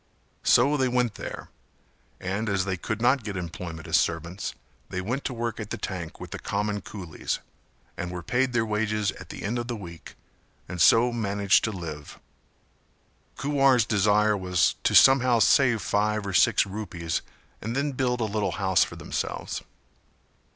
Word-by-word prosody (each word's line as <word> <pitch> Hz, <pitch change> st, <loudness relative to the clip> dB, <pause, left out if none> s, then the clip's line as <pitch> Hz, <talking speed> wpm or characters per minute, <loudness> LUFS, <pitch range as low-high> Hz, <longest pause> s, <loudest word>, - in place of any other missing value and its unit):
So 140 Hz, +5 st, +4 dB
they 130 Hz, -1 st, +2 dB
went 125 Hz, -3 st, +1 dB
there, -, -, -7 dB, 0.7 s
and 100 Hz, +4 st, -2 dB
as 95 Hz, -1 st, +1 dB
they 95 Hz, -1 st, -1 dB
could 110 Hz, +5 st, -4 dB
not 130 Hz, 0 st, +3 dB
get 105 Hz, -3 st, -4 dB
employment 85 Hz, -2 st, -6 dB
as -, -, +4 dB
servants 85 Hz, +3 st, -2 dB, 0.3 s
they 90 Hz, -, -3 dB
went 120 Hz, +9 st, -3 dB
to -, -, -1 dB
work 115 Hz, 0 st, -3 dB
at 105 Hz, -2 st, -6 dB
the -, -, -4 dB
tank 85 Hz, -4 st, -5 dB
with -, -, -9 dB
the -, -, -5 dB
common 105 Hz, 0 st, -2 dB
coolies 90 Hz, -5 st, -5 dB, 0.6 s
and 90 Hz, -, -3 dB
were 90 Hz, -1 st, -6 dB
paid 125 Hz, +7 st, +1 dB
their 120 Hz, -2 st, +1 dB
wages 105 Hz, -1 st, 0 dB
at -, -, -11 dB
the -, -, -8 dB
end 115 Hz, +4 st, -1 dB
of 120 Hz, -, -4 dB
the 120 Hz, -, -3 dB
week 85 Hz, -6 st, -10 dB, 0.5 s
and 90 Hz, -1 st, -4 dB
so 120 Hz, +8 st, +6 dB
managed 100 Hz, -3 st, +2 dB
to 110 Hz, -, -1 dB
live. 80 Hz, -6 st, -7 dB, 1.2 s
Kuwar's 135 Hz, -4 st, +3 dB
desire 105 Hz, 0 st, +3 dB
was 90 Hz, -2 st, +2 dB
to -, -, +3 dB
somehow 130 Hz, -2 st, +7 dB
save 115 Hz, +1 st, +4 dB
five 105 Hz, 0 st, 0 dB
or 100 Hz, -, -4 dB
six -, -, +4 dB
rupees 95 Hz, -5 st, -4 dB, 0.4 s
and 115 Hz, +3 st, -4 dB
then 140 Hz, +1 st, 0 dB
build 125 Hz, -2 st, -1 dB
a -, -, +2 dB
little 105 Hz, -3 st, -1 dB
house 95 Hz, -3 st, +3 dB
for -, -, -6 dB
themselves. -, -, -4 dB
105 Hz, 170 wpm, -26 LUFS, 95-120 Hz, 1.2 s, somehow